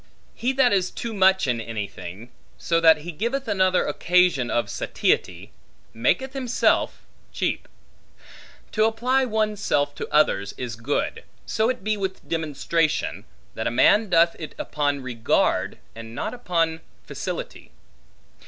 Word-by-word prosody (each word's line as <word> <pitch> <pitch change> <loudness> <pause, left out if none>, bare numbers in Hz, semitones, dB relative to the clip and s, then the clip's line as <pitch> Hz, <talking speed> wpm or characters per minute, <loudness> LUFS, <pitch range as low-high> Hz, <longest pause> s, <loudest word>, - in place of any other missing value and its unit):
He 245 +3 -1
that 260 -4 +4
is 185 -2 +2
too 235 -2 -5
much 190 -1 +4
in 120 -3 0
anything, 105 0 -7 0.3
so 165 -1 +1
that 160 -2 +6
he 175 +3 -6
giveth 235 - -2
another 185 -3 +2
occasion 175 -8 +2
of 120 -3 0
satiety, - - -1 0.4
maketh 260 - 0
himself 255 -3 +1 0.3
cheap. - - -2 1.0
To 215 0 +2
apply 250 +4 +1
one's 215 -3 -1
self 145 -6 +1
to - - -7
others, 100 -10 +2
is 125 -3 -4
good; 115 +6 -2 0.2
so 220 +2 +1
it 255 -5 -3
be 215 +1 0
with 190 -1 -4
demonstration, 160 0 -1 0.3
that 110 - -3
a - - +2
man 200 - +4
doth 170 -1 +4
it 155 - -7
upon 145 -2 -1
regard, 120 -3 0 0.2
and 115 0 -10
not 215 - -3
upon 165 -8 -1 0.2
facility. - - -6
170 Hz, 135 wpm, -24 LUFS, 130-215 Hz, 1.0 s, that